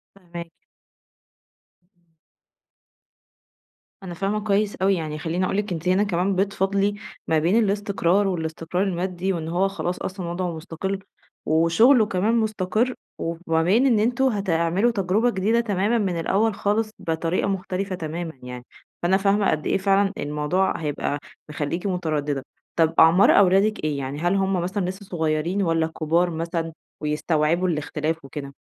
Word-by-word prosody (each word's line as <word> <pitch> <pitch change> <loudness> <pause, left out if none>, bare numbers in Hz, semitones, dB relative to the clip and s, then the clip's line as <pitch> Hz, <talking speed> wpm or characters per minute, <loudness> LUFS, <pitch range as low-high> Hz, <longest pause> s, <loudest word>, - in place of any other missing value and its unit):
فاهماكَِ. 170 -3 -9 1.4
امم. 170 -1 -39 1.9
أنا 180 -2 -6
فاهمة 195 +4 -1
كويس 205 0 +1
أوي. 195 +1 +2
يعني 155 -3 -4
خلّيني 170 +3 -1
أقول 195 - -1
لِك 205 -1 -2
أنتِ 165 +1 -5
هنا 185 +3 +3
كمان 190 0 0
بتفاضلي 195 +1 +1 0.3
ما 160 - +3
بين 170 +6 +2
الاستقرار 200 -1 +1
والإستقرار 165 0 -2
المادي 185 0 -1
وإن 165 -3 -4
هو 180 +4 +1
خلاص 180 -2 -4
أصلًا 185 -2 -4
وضْعه 180 0 -2
مُستقِل 180 +4 -4 0.5
وشُغله 190 - +5
كمان 210 +3 0
مُستقِر 220 +2 0 0.3
وما 165 -1 -1
بين 210 +10 +3
إن 240 -5 +4
أنتم 245 +5 +1
هتعملوا 195 -1 +1
تجربة 205 +3 +1
جديدة 220 +2 +1
تمامًا 210 0 +1
من 190 -6 -1
الأول 210 +6 +1
خالص 215 +2 0
بطريقة 165 +3 -1
مختلفة 190 0 -2
تمامًا 165 0 -5
يعني، 125 0 -8 0.4
فأنا 185 +2 +4
فاهمة 200 +1 +2
قد 155 -1 -2
إيه - - +2
فعلًا 195 0 +2
الموضوع 150 +6 0
هيبقى 145 -2 -2 0.3
مخلّيكِ 150 +5 -3
متردّدة. 150 -7 -1 0.3
طب 165 -1 +3
أعمار 165 +4 +7
أولادِك 200 +2 +3
إيه؟ 150 -2 -1
يعني 140 +1 -4
هل 175 +4 +1
هم 195 -2 +1
مثلًا 185 +2 -2
لسّه 190 +3 -6
صغيرين 165 +2 -1
والّا 165 -3 +1
كُبار 165 +2 +1
مثلًا 165 0 -3 0.3
ويستوعبوا 155 +3 +1
الاختلاف 155 -1 -2
وكده؟ 140 0 -7
180 Hz, 140 wpm, -23 LUFS, 165-200 Hz, 1.9 s, أعمار